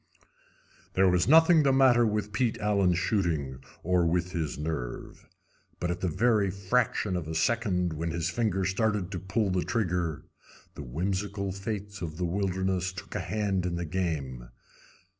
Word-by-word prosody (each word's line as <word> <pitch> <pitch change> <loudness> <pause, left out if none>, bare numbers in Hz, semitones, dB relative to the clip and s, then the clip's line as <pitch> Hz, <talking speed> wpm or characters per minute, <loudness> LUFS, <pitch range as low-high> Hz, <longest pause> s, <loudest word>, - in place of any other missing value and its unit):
There 95 +1 +4
was 90 -1 +2
nothing 160 +2 +7
the 140 -2 +3
matter 130 -3 +5
with 105 -1 -2
Pete 115 +2 +1
Allen's 100 -4 +2
shooting 80 - -1 0.2
or 90 0 +2
with 90 +1 0
his 80 -6 -3
nerve. 75 -6 -5 0.5
But 85 0 -1
at 90 +1 -4
the 95 - 0
very 105 +2 +2
fraction 100 +1 0
of 85 -3 -3
a 80 - -4
second 90 -1 +1
when 80 +2 -3
his 85 +1 -2
finger 95 -3 0
started 100 0 0
to 90 - -3
pull 95 +3 -1
the 90 -1 +1
trigger 90 - -1 0.5
the - - -8
whimsical 95 - -2
Fates 100 0 -5
of 80 -3 -5
the 90 - -1
wilderness 95 0 -1
took 90 -2 -9
a - - -2
hand 100 -4 -1
in 85 - -2
the 85 0 -3
game. 75 -9 -3
95 Hz, 160 wpm, -28 LUFS, 85-105 Hz, 0.5 s, nothing